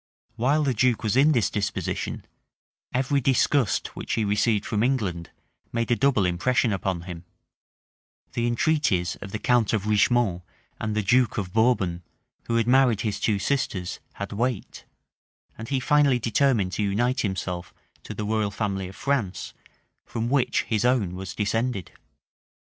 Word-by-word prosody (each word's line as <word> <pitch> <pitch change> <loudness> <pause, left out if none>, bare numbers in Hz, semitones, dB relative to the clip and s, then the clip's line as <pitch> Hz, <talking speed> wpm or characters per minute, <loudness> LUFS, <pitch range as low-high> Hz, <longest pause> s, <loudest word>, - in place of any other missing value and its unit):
While 135 +6 +2
the 135 -3 +1
duke 120 +1 +2
was 110 +1 0
in 140 +4 +5
this 120 -8 +2
disposition, 105 -1 -3 0.7
every 135 +2 +1
disgust 130 -2 +1
which - - -4
he 110 - +1
received 105 +1 +1
from 105 -2 -1
England 105 -10 -1 0.4
made 115 0 -1
a - - +5
double 125 -7 +2
impression 110 +6 +1
upon 95 -2 -2
him; 85 -1 -8 1.1
the 120 0 0
entreaties 120 - +1
of 100 - -9
the 110 - -2
count 120 -1 +2
of 105 -2 0
Richemont 105 -3 +2 0.4
and 110 -1 -2
the 110 - 0
duke 125 +4 +3
of 95 -3 -3
Bourbon, 110 -7 +2 0.5
who 115 - 0
had 115 -1 +2
married 125 -3 +4
his 105 -2 -2
two 105 -1 +1
sisters, 100 -6 -2
had 100 0 -6
weight; 120 0 -3 0.7
and 110 +1 -8
he 135 - +1
finally 145 -1 +3
determined 115 -4 +1
to 95 - -2
unite 120 +6 +1
himself 95 -3 -3 0.3
to - - -8
the 105 - -3
royal 110 -1 0
family 100 -2 -3
of 95 - -11
France, 135 -9 -2 0.5
from 115 0 -3
which 140 -3 +2
his 110 -3 -1
own 120 -8 +2
was 95 +2 -6
descended. 110 -1 -1
110 Hz, 155 wpm, -25 LUFS, 100-125 Hz, 1.1 s, in